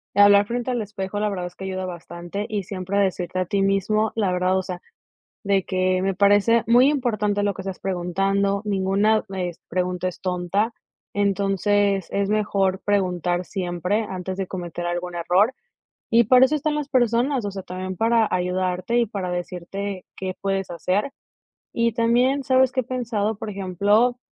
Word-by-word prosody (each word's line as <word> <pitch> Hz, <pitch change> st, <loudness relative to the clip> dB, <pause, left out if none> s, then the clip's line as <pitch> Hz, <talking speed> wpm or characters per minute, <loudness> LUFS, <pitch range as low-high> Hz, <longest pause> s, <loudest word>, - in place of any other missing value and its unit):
hablar 205 Hz, 0 st, +7 dB
frente 240 Hz, +3 st, -3 dB
al 240 Hz, -2 st, -1 dB
espejo, 200 Hz, -1 st, -5 dB
la 210 Hz, 0 st, +1 dB
verdad 180 Hz, -3 st, -3 dB
es 180 Hz, -, -13 dB
que 190 Hz, -, -7 dB
ayuda 185 Hz, -1 st, -3 dB
bastante 175 Hz, +3 st, -6 dB
y 210 Hz, -3 st, -2 dB
siempre 190 Hz, +1 st, -3 dB
decirte 185 Hz, -2 st, -1 dB
a 185 Hz, -, 0 dB
ti 195 Hz, +3 st, 0 dB
mismo 200 Hz, +2 st, +1 dB
la 205 Hz, -5 st, +1 dB
verdad, 180 Hz, +1 st, +1 dB
o -, -, +1 dB
sea, 180 Hz, -1 st, -6 dB, 0.6 s
de 195 Hz, -2 st, +2 dB
que: 185 Hz, 0 st, 0 dB
"Me 195 Hz, +1 st, 0 dB
parece 205 Hz, +4 st, +4 dB
muy 245 Hz, +4 st, +6 dB
importante 215 Hz, -7 st, 0 dB
lo 205 Hz, 0 st, +1 dB
que 190 Hz, -, -7 dB
estás 190 Hz, -1 st, -6 dB
preguntando, 195 Hz, +2 st, 0 dB
ninguna 200 Hz, +2 st, +2 dB
es 180 Hz, -3 st, -4 dB
pregunta 180 Hz, 0 st, -1 dB
es 180 Hz, -, -12 dB
tonta", 185 Hz, +5 st, -1 dB, 0.4 s
entonces 200 Hz, -1 st, +1 dB
es 200 Hz, 0 st, 0 dB
mejor 200 Hz, -3 st, +1 dB
preguntar 180 Hz, -3 st, 0 dB
siempre 180 Hz, +3 st, -1 dB
antes 185 Hz, 0 st, -5 dB
de 195 Hz, -1 st, -2 dB
cometer 175 Hz, -2 st, -5 dB
algún 175 Hz, 0 st, -3 dB
error, 180 Hz, +8 st, +2 dB, 0.6 s
y 235 Hz, +1 st, +5 dB
para 255 Hz, +3 st, +7 dB
eso 290 Hz, +4 st, 0 dB
están 300 Hz, +1 st, -1 dB
las 295 Hz, -2 st, -3 dB
personas, 245 Hz, 0 st, +2 dB
o 200 Hz, -, -2 dB
sea, 195 Hz, -1 st, -6 dB
también 185 Hz, +1 st, -5 dB
para 225 Hz, +2 st, +3 dB
ayudarte 185 Hz, +3 st, -1 dB
y 240 Hz, -, +3 dB
para 195 Hz, -3 st, -4 dB
decirte 180 Hz, +2 st, -5 dB
qué 185 Hz, -1 st, -4 dB
puedes 195 Hz, -1 st, -1 dB
hacer, 190 Hz, +9 st, -1 dB, 0.6 s
y 235 Hz, 0 st, +2 dB
también, 245 Hz, +4 st, +2 dB
¿sabes 260 Hz, -1 st, +4 dB
qué 260 Hz, -, -1 dB
he -, -, +1 dB
pensado?, 225 Hz, -4 st, -2 dB
por 215 Hz, -, -5 dB
ejemplo, 205 Hz, +5 st, +2 dB
195 Hz, 175 wpm, -23 LUFS, 185-215 Hz, 0.6 s, hablar